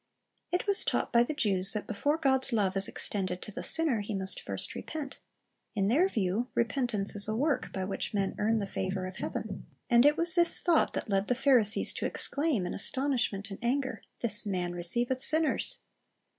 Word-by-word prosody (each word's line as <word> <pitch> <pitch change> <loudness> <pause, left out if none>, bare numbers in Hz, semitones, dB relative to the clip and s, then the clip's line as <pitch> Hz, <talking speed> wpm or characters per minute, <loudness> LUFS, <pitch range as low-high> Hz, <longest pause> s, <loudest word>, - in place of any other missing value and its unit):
It 355 - -3
was 400 -1 +3
taught - - -4
by 235 - +3
the 270 +6 -4
Jews 195 -7 0
that 210 - -6
before 285 +8 -3
God's 270 -4 +2
lov^e 205 -6 -2
is 195 0 +8
extended 185 -3 -4
to 210 - -7
the - - -7
sinner, 315 -9 +1
he 205 +1 -7
must 190 -1 +1
first - - -5
repent. 290 -3 -9 0.6
In 200 -1 -2
their 330 - 0
view, 215 - -4
repentance 235 -4 -2
is 205 0 +2
a 215 - -4
work 280 +2 -3
by 190 -1 -6
which 195 - -5
men 200 -2 -4
earn 225 +2 -1
the 205 - -4
favor 190 -1 -6
of 185 0 -10
heaven. 205 -3 -8 0.2
And 235 0 +3
it 295 +2 +1
was 340 +1 +5
this 345 -1 +5
thought 340 -3 -1
that - - -6
led 195 -1 -3
the 250 - -2
Pharisees 245 -5 +5
to - - -5
exclaim 280 - -2
in 180 - -6
astonishment 240 -5 -1
and 195 - -10
anger, 255 -2 -4 0.2
"This 215 -3 +8
man 180 -4 -5
receiveth 240 +9 +2
sinners." 315 +3 +4
225 Hz, 195 wpm, -27 LUFS, 195-275 Hz, 0.6 s, is